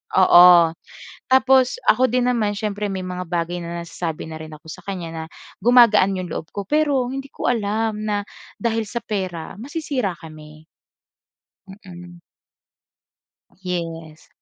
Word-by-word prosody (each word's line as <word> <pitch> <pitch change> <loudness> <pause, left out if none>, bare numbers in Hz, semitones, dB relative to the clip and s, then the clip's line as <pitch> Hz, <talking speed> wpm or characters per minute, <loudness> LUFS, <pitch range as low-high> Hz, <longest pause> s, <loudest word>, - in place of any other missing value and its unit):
oo. 180 -1 +8 0.8
Tapos 260 -1 +4
ako 255 +1 +5
din 245 +1 +1
naman 215 -4 0
siyempre 210 0 -3
may 190 -1 -4
mga 180 0 -5
bagay 175 +1 -2
na 170 0 -5
nasasabi 165 -2 -5
na 160 - -7
rin 155 0 -9
ako 155 - -16
sa - - -10
kanya 185 -4 -5
na 160 -1 -5 0.4
gumagaan 225 -4 +5
'yong 180 -3 -5
loob 160 - -5
ko. 200 - -3
Pero 290 -5 +1
hindi 270 0 -5
ko - - -3
alam 220 -1 -1
na 205 -1 -1 0.4
dahil 225 -1 0
sa 235 +3 -4
pera 185 -6 -4
masisira 265 - -3
kami. 155 -1 -13 1.0
Mm. 175 -3 -12 1.4
Yes. 165 -3 -6
195 Hz, 135 wpm, -21 LUFS, 170-235 Hz, 1.4 s, oo